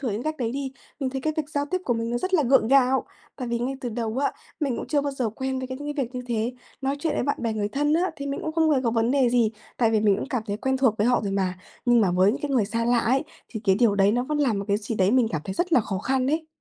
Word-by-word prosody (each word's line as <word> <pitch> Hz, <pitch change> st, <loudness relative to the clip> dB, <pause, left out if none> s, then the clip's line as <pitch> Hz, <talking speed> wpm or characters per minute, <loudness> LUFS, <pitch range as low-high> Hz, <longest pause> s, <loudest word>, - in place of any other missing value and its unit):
thử 260 Hz, -4 st, -1 dB
những 210 Hz, +3 st, -3 dB
cách 310 Hz, +2 st, -2 dB
đấy 235 Hz, -4 st, -2 dB
đi, 270 Hz, 0 st, -4 dB, 0.3 s
mình 265 Hz, -2 st, -1 dB
thấy 265 Hz, 0 st, -3 dB
cái 310 Hz, +3 st, -1 dB
việc 305 Hz, -2 st, -2 dB
giao 285 Hz, -1 st, 0 dB
tiếp 370 Hz, -, +1 dB
của 240 Hz, -, +1 dB
mình 230 Hz, 0 st, -2 dB
nó 240 Hz, -, 0 dB
rất 370 Hz, +7 st, -1 dB
là 325 Hz, -, +4 dB
gượng 260 Hz, -3 st, +4 dB
gạo. 265 Hz, 0 st, +4 dB, 0.3 s
Tại 255 Hz, -3 st, -4 dB
vì 235 Hz, 0 st, 0 dB
ngay 250 Hz, +3 st, -2 dB
từ 245 Hz, -, -3 dB
đầu 230 Hz, +1 st, -3 dB
á, 280 Hz, -, +1 dB, 0.3 s
mình 275 Hz, -5 st, 0 dB
cũng -, -, -5 dB
chưa 295 Hz, -, +1 dB
bao 285 Hz, 0 st, -2 dB
giờ 255 Hz, -4 st, -1 dB
quen 265 Hz, +4 st, -3 dB
với 260 Hz, -, -4 dB
cái 260 Hz, +1 st, -5 dB
những 295 Hz, 0 st, -4 dB
cái 275 Hz, -, +1 dB
việc 245 Hz, +2 st, -12 dB
như 250 Hz, -, -3 dB
thế. 235 Hz, 0 st, -1 dB, 0.3 s
Nói 270 Hz, +1 st, 0 dB
chuyện 310 Hz, +1 st, -1 dB
với -, -, 0 dB
bạn 285 Hz, -, 0 dB
bè 230 Hz, -2 st, 0 dB
người 210 Hz, -1 st, -1 dB
thân 295 Hz, +6 st, +1 dB
á, 335 Hz, -, +3 dB
thì 280 Hz, -, -5 dB
mình 280 Hz, 0 st, -3 dB
cũng 315 Hz, -, -3 dB
không 320 Hz, -1 st, +3 dB
hề 285 Hz, -, +4 dB
có 230 Hz, -, +2 dB
vấn 225 Hz, +1 st, +1 dB
đề 265 Hz, -2 st, +3 dB
gì 235 Hz, -3 st, +3 dB, 0.3 s
tại 230 Hz, -2 st, +3 dB
vì 220 Hz, -1 st, +2 dB
mình 205 Hz, -2 st, +4 dB
cũng 275 Hz, -, -5 dB
cảm 250 Hz, -6 st, -1 dB
thấy 205 Hz, -1 st, -2 dB
quen 265 Hz, +3 st, 0 dB
thuộc 260 Hz, -5 st, +3 dB
với 210 Hz, -, +2 dB
họ 245 Hz, -, +3 dB
rồi 200 Hz, -, -2 dB
mà, 185 Hz, -2 st, -1 dB, 0.3 s
nhưng 240 Hz, -2 st, +5 dB
mà 195 Hz, -4 st, +3 dB
với 185 Hz, +3 st, +4 dB
những -, -, -4 dB
cái 290 Hz, -, -2 dB
người 250 Hz, -6 st, +3 dB
xa 230 Hz, +3 st, -2 dB
lạ 240 Hz, +1 st, +3 dB
ấy, 260 Hz, +6 st, +1 dB, 0.2 s
thì 220 Hz, -, -6 dB
cái 195 Hz, -2 st, +4 dB
điều 230 Hz, -4 st, +4 dB
đấy 200 Hz, 0 st, +4 dB
nó 245 Hz, +2 st, +1 dB
vẫn 300 Hz, +2 st, -2 dB
làm 250 Hz, -8 st, +2 dB
một 200 Hz, -, -3 dB
cái 200 Hz, -, +3 dB
gì 210 Hz, +2 st, -4 dB
đấy 190 Hz, -2 st, +3 dB
mình 245 Hz, -1 st, +3 dB
cảm 160 Hz, -, -2 dB
thấy 190 Hz, -, -4 dB
rất 350 Hz, -, -1 dB
là 260 Hz, -, +6 dB
khó 200 Hz, -3 st, -3 dB
khăn 260 Hz, +4 st, 0 dB
ấy. 315 Hz, +3 st, 0 dB
250 Hz, 340 wpm, -25 LUFS, 220-275 Hz, 0.3 s, là